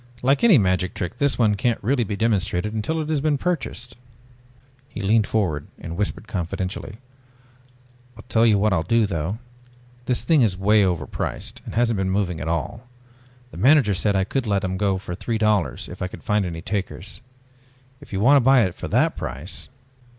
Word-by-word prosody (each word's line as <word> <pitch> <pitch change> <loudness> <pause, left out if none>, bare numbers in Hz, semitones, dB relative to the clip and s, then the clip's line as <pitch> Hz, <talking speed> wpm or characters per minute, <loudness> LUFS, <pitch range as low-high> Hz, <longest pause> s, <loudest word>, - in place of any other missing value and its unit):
Like 135 - +2
any 220 -9 +7
magic 95 -3 +1
trick 90 +7 -4
this 140 +1 +2
one 110 -3 +3
can't 120 +3 0
be - - -15
really 135 -3 +2
demonstrated 105 -2 -1
until 135 +9 -2
it 155 - -5
has 155 -3 0
been 150 -1 +1
purchased." 135 -7 -3 0.9
He - - -8
leaned 105 +1 +2
forward 85 -10 -1
and 85 - -7
whispered 105 +3 -3
confidentially. 95 +1 -4 1.2
"I'll 110 - -12
tell 115 -1 +2
you 110 -3 +5
what 105 0 +2
I'll 85 - +2
do 115 +7 +2
though. 85 +1 -2 0.7
This 125 - 0
thing 160 -4 +4
is 100 -6 +2
way 105 +3 +4
overpriced 90 -5 -3
and - - -7
hasn't 115 -2 +2
been 95 -1 0
moving 95 -4 -1
at - - -4
all. 85 +8 -3 0.6
The - - -11
manager 130 - +5
said 100 +2 0
I 95 - +2
could 125 +5 -2
let 100 -1 +1
them 95 0 -2
go 100 0 +1
at 90 - -5
three 115 -2 -2
dollars 105 - 0
if - - -10
I 90 - -1
could - - -11
find 105 -2 +1
any 80 -1 -6
takers. 100 +1 -4 0.8
If - - -15
you 95 -1 -2
want 140 +6 +6
to - - +4
buy 130 -1 +6
it 95 -3 -1
for - - -7
that - - +2
price...." 70 +9 -6
105 Hz, 195 wpm, -23 LUFS, 95-120 Hz, 1.2 s, any